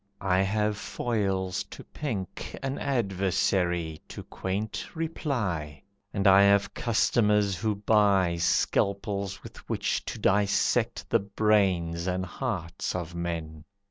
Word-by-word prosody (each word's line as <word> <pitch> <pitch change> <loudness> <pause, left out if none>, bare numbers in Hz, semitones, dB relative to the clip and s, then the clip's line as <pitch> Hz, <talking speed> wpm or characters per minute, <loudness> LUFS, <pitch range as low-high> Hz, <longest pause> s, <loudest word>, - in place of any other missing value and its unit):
I 95 -1 +2
have 105 +1 0
foils 95 -6 -1
to - - -11
pink 110 - -5
An 135 +1 -2
adversary 95 - 0
to - - -8
quaint 100 +3 -4
reply, 105 - -3 0.3
And 100 -1 -2
I 95 0 +8
have 100 0 +4
customers 105 -3 +2
who 105 +4 -1
buy 100 -4 +3
Scalpels 100 +3 0
with - - -11
which - - -1
to - - -5
dissect 100 +1 +1
the - - +5
brains 95 -5 +1
And 95 0 -1
hearts 90 -8 -4
of 85 -1 -4
men. 85 -3 -4
100 Hz, 115 wpm, -28 LUFS, 90-105 Hz, 0.3 s, I